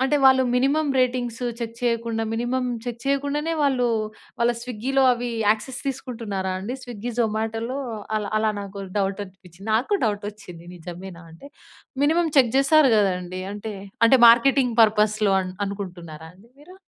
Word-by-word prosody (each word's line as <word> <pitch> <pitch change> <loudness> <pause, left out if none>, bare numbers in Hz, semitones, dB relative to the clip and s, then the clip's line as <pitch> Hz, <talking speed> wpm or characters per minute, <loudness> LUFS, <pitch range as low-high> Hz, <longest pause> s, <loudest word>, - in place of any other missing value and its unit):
అంటే 295 +2 +2
వాళ్ళు 260 0 +6
minimum 280 +4 +2
ratings 250 -1 -1 0.2
check 230 0 -5
చేయకుండా, 230 -1 -1
మినిమమ్ 250 +2 -1
చెక్ 235 -1 -5
చేయకుండానే 285 +3 0
వాళ్ళు, 255 -4 +2 0.5
వాళ్ళ 240 +1 +3
స్విగ్గీలో 250 +3 -1
అవి 240 0 -3 0.2
యాక్సెస్ 220 +4 -2
తీసుకుంటున్నారా 225 -8 -4
అండి? 240 +7 -5
స్విగ్గీ, 240 0 -6
జొమాటోలో 225 +3 -2 0.4
అలా, 205 -1 -5
అలా 215 0 +1
నాకు 200 0 -8 0.2
డౌట్ 195 +1 -1
అనిపించింది. 190 +1 -14
నాకూ 270 - +1
డౌట్ 205 -1 -2
వచ్చింది, 180 -5 -13
నిజమేనా! 175 +1 -9
అంటే, 185 +13 -13 0.6
మినిమమ్ 325 +2 +2
చెక్ 240 -4 +4
చేస్తారు 275 0 +5
కదండీ! 185 -2 -1
అంటే, 210 +1 -6 0.3
అంటే 260 +2 +5
మార్కెటింగ్ 250 +1 +4
పర్పస్‌లో 210 -1 +3
అన్ 185 0 -6
అనుకుంటున్నారా 175 -5 -7
అండి 205 +5 -21
మీరు? 345 +6 -15
230 Hz, 140 wpm, -23 LUFS, 200-260 Hz, 0.6 s, వాళ్ళు